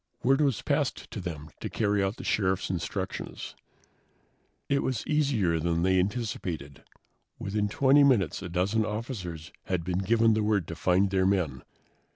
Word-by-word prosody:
Word 135 +3 +4
was 135 -8 +1
passed - - -1
to - - -5
them 80 -3 -6
to - - -4
carry 105 -2 +1
out 95 +2 -1
the - - -8
Sheriff's 95 -2 0
instructions. 95 +2 -4 1.1
It 140 0 +2
was 130 -3 -2
easier 130 - +1
than 85 +1 0
they 95 0 +3
anticipated. 90 - -3 0.5
Within 105 +1 -1
20 140 +6 +5
minutes 110 - +3
a 90 - -6
dozen 95 +6 +1
officers 105 - -5
had 90 -3 -1
been 90 +1 -1
given 115 +3 +3
the 110 - +1
word 105 -5 +1
to 85 - -4
find 95 +4 +2
their 95 -1 +2
men. 85 -10 0
95 Hz, 160 wpm, -28 LUFS, 90-110 Hz, 1.1 s, 20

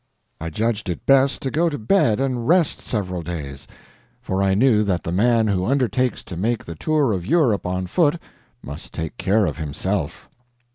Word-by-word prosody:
I 80 - -4
judged 105 +3 -2
it 85 - -5
best 135 0 +3
to 135 - -2
go 165 +6 +2
to 145 - -4
bed 115 - +2
and 125 -3 -1
rest 170 -1 +3
several 95 -6 -3
days, 75 -5 -6 0.5
for 95 -6 -2
I 95 -1 +2
knew 110 -1 +4
that 95 -4 0
the 85 - -3
man 115 +4 +3
who 95 -3 0
undertakes 125 +1 0
to 90 - -8
make 110 +6 -1
the 85 - -6
tour 145 - +1
of 90 -3 -3
Europe 115 - +2
on 90 0 -2
foot 150 - +2 0.5
must 70 +2 -9
take 80 -1 -4
care 105 +2 +2
of 75 -3 -3
himself. 75 -3 -3
105 Hz, 185 wpm, -22 LUFS, 90-130 Hz, 0.5 s, knew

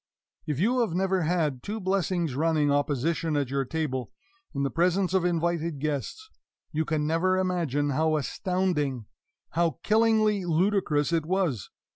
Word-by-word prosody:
If 150 -2 -2
you 240 +8 +2
have 225 -9 0
never 190 0 +1
had 155 -6 0
two 215 +2 -4
blessings 185 -5 0
running 150 0 +2
opposition 145 +3 0
at 140 -3 -1
your 135 -1 0
table, 130 -5 -3 0.4
in 140 -1 -2
the 140 - -1
presence 180 +2 +1
of 190 -2 +2
invited 170 -2 0
guests, 150 - -3 0.4
you 160 0 -1
can 155 -1 -1
never 170 +4 +2
imagine 165 -6 0
how 155 +3 +1
astounding, 150 - -1 0.5
how 165 -3 0
killingly 215 -2 +3
ludicrous 170 -3 +1
it 160 -2 0
was! 175 - -1
165 Hz, 145 wpm, -27 LUFS, 145-185 Hz, 0.5 s, killingly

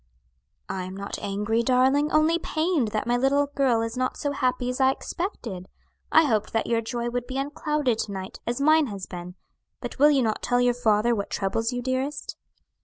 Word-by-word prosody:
"I 185 -1 -4
am 185 +1 -8
not 200 0 -5
angry, 210 +3 0
darling; 265 +4 +3
only 315 +2 +3
pained 315 -6 0
that 215 0 -2
my 240 +1 +1
little 275 +3 +3
girl 255 -5 +2
is 230 +1 -4
not 255 0 -1
so 285 - -2
happy 255 -2 0
as 250 +2 -2
I 265 - +6
expected. 240 - -4 0.4
I 320 - +7
hoped 215 -6 0
that 225 - +1
your 230 -1 +1
joy 235 +1 -3
would 245 0 -3
be 260 - -4
unclouded 285 -3 -1
to 210 - -2
night, 190 -1 -6
as 240 +2 -1
mine 310 +1 +4
has 200 -4 -6
been; 180 0 -8 0.4
but - - -7
will 295 +2 +7
you 275 -3 +3
not 220 -2 -1
tell 245 0 +1
your 245 0 +3
father 230 -1 +2
what 200 -3 -3
troubles 225 +4 -1
you, 245 0 -3
dearest?" 260 +3 -2
245 Hz, 200 wpm, -25 LUFS, 220-280 Hz, 0.4 s, I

